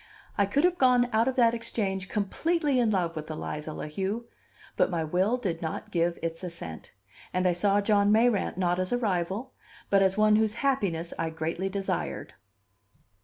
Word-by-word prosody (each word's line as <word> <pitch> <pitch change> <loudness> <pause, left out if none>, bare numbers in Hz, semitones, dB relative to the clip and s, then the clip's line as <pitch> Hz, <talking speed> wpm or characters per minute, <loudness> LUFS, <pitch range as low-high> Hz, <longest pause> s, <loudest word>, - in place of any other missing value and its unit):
I 200 - +2
could 280 +9 +1
have 355 0 +2
gone 250 -2 +4
out 225 +2 +3
of 260 - 0
that 235 -2 +4
Exchange 195 -5 -2
completely 290 - 0
in 235 -2 +3
love 175 -5 0
with 155 0 -6
Eliza 155 0 -5
La - - -6
Heu; 195 +9 -3 0.5
but - - +3
my 170 -3 -1
will 185 +9 +1
did 180 -9 -3
not 160 -1 -5
give 170 0 +1
its 165 +1 -4
assent, 170 - -7 0.4
and 185 0 +1
I 180 - +3
saw 200 +3 +2
John 205 0 +3
Mayrant 225 -2 +2
not 180 -1 +1
as 185 0 -1
a 245 - +2
rival, 205 +3 -2 0.4
but 200 -1 +5
as 190 0 +2
one 215 0 +5
whose 220 -1 +1
happiness 185 -11 0
I 165 - 0
greatly 165 +4 -3
desired. 195 0 -3
195 Hz, 180 wpm, -28 LUFS, 170-230 Hz, 0.5 s, but